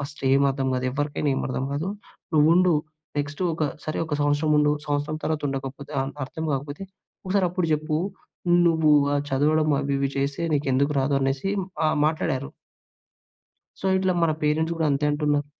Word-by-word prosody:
ఫస్టేం 140 -1 +1
అర్థం 135 0 -1
గాదు, 130 0 -1
ఎవరికైనా 145 +1 -1
ఏమి - - -2
అర్థం 130 0 -2
గాదు. 150 +6 -2 0.5
నువ్వుండు, 165 +4 +5 0.4
నెక్స్టు 145 +4 -3
ఒక 155 -1 -1 0.2
సరే 155 - -3
ఒక 155 - -2
సంవత్సరం 145 +1 +1
ఉండు. 150 0 +4
సంవత్సరం 145 +1 -1
తర్వాత 155 -1 -1
ఉండకపోతే 135 +1 -5
ఆన్ 135 +1 -3
అర్థం 160 +4 -6
కాకపోతే, 145 +5 -4 0.4
ఒకసారప్పుడు 185 -2 +1
చెప్పు. 155 0 0 0.7
నువ్వు 160 -2 +3 0.2
ఆహ్, 145 - +1
చదవడం 155 +3 +2
అవి 140 0 -1
ఇవి 135 0 0
చేసే 140 +3 -1
నీకెందుకు 140 0 +1
రాదు?" 140 +1 +1
అనేసి 135 +6 0 0.4
ఆహ్, 155 - +1
మాట్లాడారు. 140 -4 -1 1.3
సో, - - -2
ఇట్లా 185 -1 +1
మన 165 -2 +3
పేరెంట్స్ 155 +2 +1
గూడా 160 -1 +1
అంతే 140 +1 +1
అంటున్నారు. 145 -1 0
145 Hz, 155 wpm, -25 LUFS, 140-155 Hz, 1.3 s, నువ్వుండు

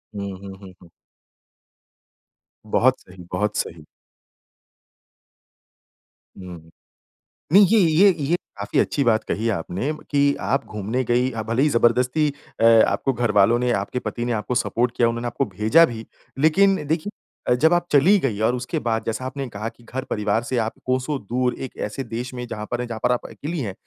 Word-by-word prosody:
हुँ, 100 -1 -4
हुँ, 95 0 -9
हुँ, 95 -2 -12
हुँ। 85 - -17 1.8
बहुत 125 +4 +2
सही, 90 0 -14
बहुत 105 +3 -1
सही। 80 -2 -4 2.6
हुँ। 85 -3 -10 0.8
नहीं 200 +2 +8
ये 220 +2 +4
ये 175 +4 +5 0.2
ये 170 +5 +2 0.2
काफ़ी 100 0 -1
अच्छी 140 - +1
बात 110 -3 +2
कही 115 +2 -2
आपने, 95 - -2 0.2
कि 140 0 +3
आप 135 - -1
घूमने 110 +5 -3
गई 125 +2 +1
अ, 115 - -4
भले 115 +4 -1
ही 150 - +3
ज़बरदस्ती 125 +5 +2 0.3
अ, 115 - +3 0.2
आपको 135 - 0
घरवालों 115 -1 +3
ने 125 0 +1
आपके 100 +4 -2
पति 120 -1 -4
ने 120 - -2
आपको 110 +3 -2
सपोर्ट 125 0 0
किया 120 - +4
उन्होंने 120 +1 -3
आपको 120 - -1
भेजा 110 - +4
भी। 115 -4 -7 0.3
लेकिन 190 +3 +3
देखिए 165 +6 -1 0.5
जब 160 +2 +5
आप 175 0 +1
चली 165 +9 +5
गई 115 -9 -2
और 125 - +1
उसके 125 0 -3
बाद 115 -1 -1
जैसा 115 +3 -3
आपने 135 0 -4
कहा 105 +1 -5
कि 120 - -22
घर 130 +3 -5
परिवार 105 +2 0
से 125 0 -3
आप 110 - -4
कोसो 130 +3 -1
दूर 125 +4 -1
एक 130 - -12
ऐसे 105 +6 -5
देश 120 +2 -6
में 125 -1 -5
जहाँ 105 -2 -6
पर 120 0 -1
हैं, 125 - -4
जहाँ 115 -2 -6
पर 125 - +3
आप 125 - -1
अकेली 160 +3 -5
हैं। 100 -7 -3
120 Hz, 180 wpm, -22 LUFS, 105-135 Hz, 2.6 s, नहीं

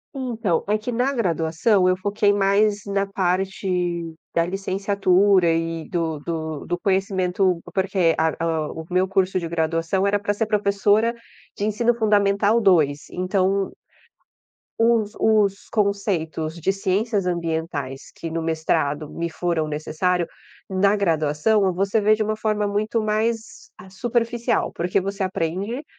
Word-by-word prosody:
Então, 230 -10 -1
é 210 +1 +2
que 220 +3 -5
na 250 +3 +1
graduação 185 - +1
eu 185 - +2
foquei 205 +2 +1
mais 205 +1 +2
na 200 0 -1
parte 180 -3 -1 0.2
da 170 - +2
licenciatura 195 -1 +2
e 165 0 -2
do 165 -4 -2
do 160 -1 -4
do 175 - -1
conhecimento, 190 -1 +1
porque 190 -3 +2
a 160 0 +2 0.4
o 160 - -7
o - - -17
meu 185 +1 +3
curso 190 -1 +1
de 170 - -4
graduação 165 +3 0
era 205 +1 +2
pra 205 0 -1
ser 225 +2 -1
professora 210 +2 +2 0.4
de 205 - -1
ensino 230 +3 +1
fundamental 205 0 +3
dois, 155 -8 +3
então 190 +1 0 1.1
os 225 -2 +2
os 210 -3 +2
conceitos 190 -7 -1
de 180 +4 +1
ciências 195 +2 0
ambientais 160 -6 -3
que 165 - -6
no 165 0 -2
mestrado 160 -2 -1
me 170 0 -4
foram 165 -2 -1
necessário, 165 +4 -1 0.4
na 200 +2 +3
graduação, 185 +2 +2
você 195 +4 +1
vê 215 +1 +4
de 215 - -1
um 215 0 -1
forma 215 -1 0
muito 215 +3 0
mais, 220 +1 -2
ah, 190 - -13
superficial 235 +3 -1
porque 180 +3 0
você 195 +1 -4
aprende, 190 - -2
195 Hz, 140 wpm, -22 LUFS, 170-210 Hz, 1.1 s, vê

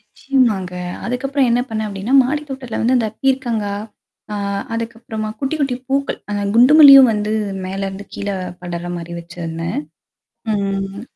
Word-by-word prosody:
நிச்சயமாங்க. 230 -9 0 0.3
அதுக்கப்புறம் 265 +2 0
என்ன 240 +1 +3
பண்ணேன் 220 -1 -2
அப்டின்னா, 205 +6 -2
மாடித்தோட்டத்துல 270 -3 -4
வந்து 250 +3 +3
அந்த 230 -3 +1
பீர்கங்கா, 240 -6 0 0.6
ஆ - - -2 0.4
அதுக்கப்புறமா 225 -1 -4
குட்டி 275 +3 -1
குட்டி 270 -3 0
பூக்கள், 275 0 -1
அந்த 205 0 -1
குண்டு 245 +5 +6
மல்லியும் 275 -4 +10
வந்து 210 0 -1 0.3
மேலருந்து 195 +1 -4
கீழ 205 - -4 0.3
படர்ற 175 -1 -5
மாரி 170 0 -7
வச்சருந்தேன். 170 -1 -5 0.8
ம். 195 0 -2
225 Hz, 130 wpm, -19 LUFS, 195-260 Hz, 0.8 s, மல்லியும்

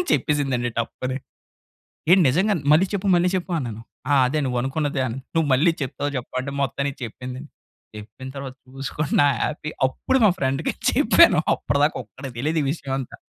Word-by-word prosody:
అని - - 0
చెప్పేసిందండి 135 -5 0
టప్ 115 - -2
అని. 130 0 -2 0.9
"ఏంటి 185 +2 +7
నిజంగానే! 185 +3 +1
మళ్ళి 175 +5 +5
చెప్పు, 200 0 -1
మళ్ళి 175 +1 +3
చెప్పు" 185 0 -3
అన్నాను. 115 -5 -5 0.3
"ఆ! - - +5
అదే 150 +4 -1
నువ్వనుకున్నదే" 135 +3 -1
అని. 120 +2 -5 0.2
"నువ్వు 160 -2 +2
మళ్ళీ 165 +6 +4
చెప్తావా 140 +2 -3
జెప్పవా!" 125 +1 -4
అంటే 140 +1 -5
మొత్తానికి 140 +1 -2
చెప్పిందండి. 125 +5 -8 0.5
చెప్పిన 105 +5 -9
తర్వాత 135 -1 -6 0.2
చూసుకోండి 140 +2 -3
నా - - +5 0.2
హ్యాపీ 150 0 -2 0.2
అప్పుడు 260 - 0
మా 210 - +7
ఫ్రెండ్‌కి 135 +2 0 0.2
చెప్పాను - - +5
అప్పటి 140 - -1
దాకా 150 - +2
ఒక్కడికి 135 -4 -10
తెలీదు 155 +6 0
ఈ - - -2
విషయం 145 -3 -6
అంతా. 130 - -7
140 Hz, 170 wpm, -23 LUFS, 130-155 Hz, 0.9 s, ఏంటి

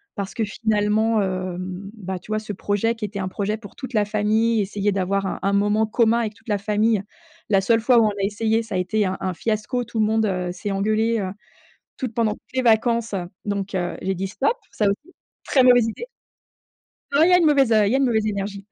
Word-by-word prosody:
Parce 200 -2 -5
que 225 - 0
finalement, 215 +1 +1
heu, 185 -2 -2
bah, 190 +1 -6
tu - - -19
vois 215 - 0
ce 215 -1 -5
projet 205 +4 0
qui 225 -2 -10
était 205 0 -4
un 185 - -2
projet 205 +3 -2
pour 210 -3 -13
toute 260 -2 -8
la 210 -1 +3
famille, 215 +2 +1
essayer 205 +1 -1
d'avoir 195 0 0
un 190 - -3
un 195 +1 0
moment 210 +2 +2
commun 230 +1 +3
avec 220 -3 -2
toute - - -24
la 205 -2 0
famille. 210 +1 +1 0.5
La 195 -2 +4
seule 225 +3 +2
fois 245 +2 +4
où 230 - +6
on - - +3
a 200 -1 -4
essayé 220 +3 +1
ça 225 -3 -6
a - - +1
été 200 +4 0
un 185 - -3
un 185 -1 -1
fiasco, 220 +6 -2
tout 230 -1 -5
le 215 - +4
monde, 220 0 +1
heu, 180 -2 -2
s'est 180 +3 -5
engueulé, 215 +3 +1
heu, 190 -2 -3 0.7
toutes 250 -4 -4
pendant 220 -2 +1
toutes - - -23
les 260 - +1
vacances, 230 -1 +2
heu, 180 -2 -2 0.2
donc 200 -1 -3
heu, 175 -1 -2
j'ai 190 +1 -1
dit 190 +1 -3
stop, 275 - 0
ça 215 - -1
aussi, 205 - -2 0.3
très 260 -2 +3
mauvaise 245 -2 +6
idée. 350 - -6 1.1
Non 285 +2 +4
il 355 - +4
y - - +4
a 360 - +7
une 345 - +2
mauvaise, 275 -5 +4
heu 215 -2 +4
il 200 - +1
y - - +2
a - - +4
une 275 - +2
mauvaise 220 -4 +1
énergie. 200 -1 -4
210 Hz, 245 wpm, -22 LUFS, 195-225 Hz, 1.1 s, a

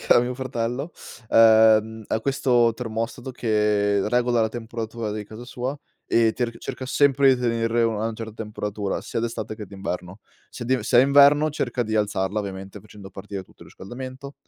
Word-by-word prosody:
che - - +4
ha - - +6
mio 125 +1 -2
fratello, 130 +3 -3 0.4
ehm, 110 -1 +5
ha 110 - -1
questo 125 -3 +2
termostato 115 +2 -4
che 105 -3 +1
regola 120 0 +2
la 110 - +1
temperatura 115 -1 -5
di 105 -1 -5
casa 110 +4 -10
sua 125 +3 -4 0.3
e 115 -1 +3
ter 115 -2 -3
cerca 130 - -6
sempre 135 0 +4
di 125 - -6
tener 115 -1 0
a 115 0 +3
una 110 0 -2
certa 110 -1 -7
temperatura, 105 -2 -4
sia - - -4
d'estate 115 -1 -4
che 105 - -8
d'inverno. 95 -1 -6 0.3
Se 120 - -8
de 125 -1 0
se 120 - +3
è - - +8
inverno, 145 +2 +5
cerca 125 -4 -2
di 110 -1 -3
alzarla, 100 -1 0
ovviamente, 95 -1 -7
facendo 100 -2 -13
partire 100 0 -7
tutto - - -19
il - - -14
riscaldamento. 130 +6 -9
115 Hz, 180 wpm, -24 LUFS, 105-125 Hz, 0.4 s, è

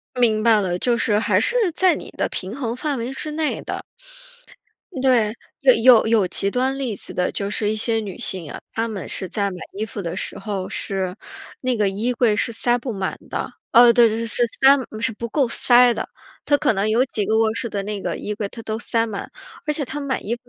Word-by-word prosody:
明 225 -4 +2
白 220 -2 +5
了。 180 -3 -1
就 240 +4 +1
是 210 -3 +1
还 220 - +2
是 - - +1 0.2
在 370 0 +4
你 - - -8
的 - - 0
平 195 +5 -5
衡 240 -4 -3
范 285 0 -2
围 235 +3 -4
之 305 +3 -4
内 310 0 -1
的。 - - -5 1.2
对， 240 -5 +3 0.3
有 - - +6
有 240 -1 +6
有 220 -4 +3
极 195 +2 0
端 260 +4 0
例 250 -6 -3
子 - - -3
的， 180 - 0
就 200 - -3
是 210 0 0
一 215 - -1
些 225 +1 0
女 210 -4 -4
性 175 -6 -3
啊， - - -6
她 225 +1 -1
们 210 -4 -5
是 185 - -4
在 200 0 -1
买 185 - -7 0.2
衣 210 +2 -2
服 205 - -7
的 170 -2 -4
时 - - -4
候， 195 -2 -4
是 190 -2 -2 0.5
那 255 -2 0
个 210 -2 +2
衣 215 +6 -1
柜 235 -3 +3
是 235 - -1
塞 240 +2 +2
不 245 0 -5
满 195 -2 -3
的。 - - -4 0.2
哦， 240 0 +8
对 235 -1 +6
对 220 - -2
对， 230 0 -3
是 235 - 0
塞 270 +4 +5 0.2
是 230 +1 0
不 235 +2 -6
够 275 +3 +1
塞 245 +1 +5
的。 - - -4 0.4
她 290 - +4
可 285 -4 +2
能 200 +1 0
有 230 +4 +3
几 220 -5 -2
个 220 - +2
卧 220 -1 +3
室 235 - -2
的 205 -2 -3
那 205 0 -4
个 - - -2
衣 210 - -4
柜， 205 -1 -3
她 230 - -10
都 220 0 -3
塞 230 -1 0
满。 210 -3 -6 0.4
而 300 - +1
且 290 - -2
她 295 +3 -6
买 275 -3 -2
衣 230 - -2
服 245 +1 -16
225 Hz, 255 characters per minute, -21 LUFS, 205-250 Hz, 1.2 s, 哦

